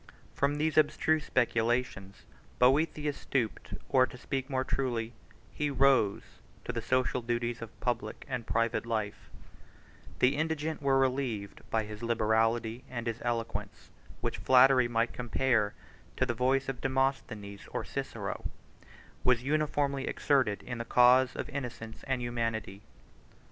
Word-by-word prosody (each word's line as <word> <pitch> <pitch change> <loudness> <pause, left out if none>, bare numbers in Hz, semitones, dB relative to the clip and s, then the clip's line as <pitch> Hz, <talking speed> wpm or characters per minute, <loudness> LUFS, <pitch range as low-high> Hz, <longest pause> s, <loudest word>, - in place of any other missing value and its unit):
From 140 +1 +1
these 155 +1 +2
abstruse 155 0 +2
speculations, 115 -5 0 0.3
Boethius 145 +3 +2
stooped, 120 -6 -2
or, 130 -1 +4
to 125 - -11
speak 135 +2 -3
more 130 -1 0
truly, 120 -4 -2 0.4
he 150 -1 -1
rose 135 -7 +3 0.4
to 125 - -3
the 115 - -2
social 130 +1 +1
duties 120 0 -2
of 115 -1 -9
public 115 -3 -2
and 125 -4 -4
private 115 +1 0
life: 110 -3 -3 0.9
the 135 +3 +3
indigent 155 0 -2
were 135 -1 +3
relieved 130 -6 -1
by 110 -1 +1
his 105 0 -8
liberality; 115 +1 +1
and 120 -2 -5
his 115 0 -3
eloquence, 115 -1 -4 0.3
which - - -2
flattery 130 -1 +6
might 115 0 0
compare 120 -3 +1 0.4
to 130 - +2
the 120 - -1
voice 130 +3 +1
of 135 -2 -4
Demosthenes 130 -7 -2
or - - -3
Cicero, - - -4 0.7
was 125 -1 +3
uniformly 145 -1 0
exerted 130 -8 +1
in 125 -1 -5
the - - -2
cause 125 +2 +5
of - - -4
innocence 120 -5 -6
and 130 -2 -1
humanity. 115 -4 -3
125 Hz, 135 wpm, -30 LUFS, 115-135 Hz, 0.9 s, flattery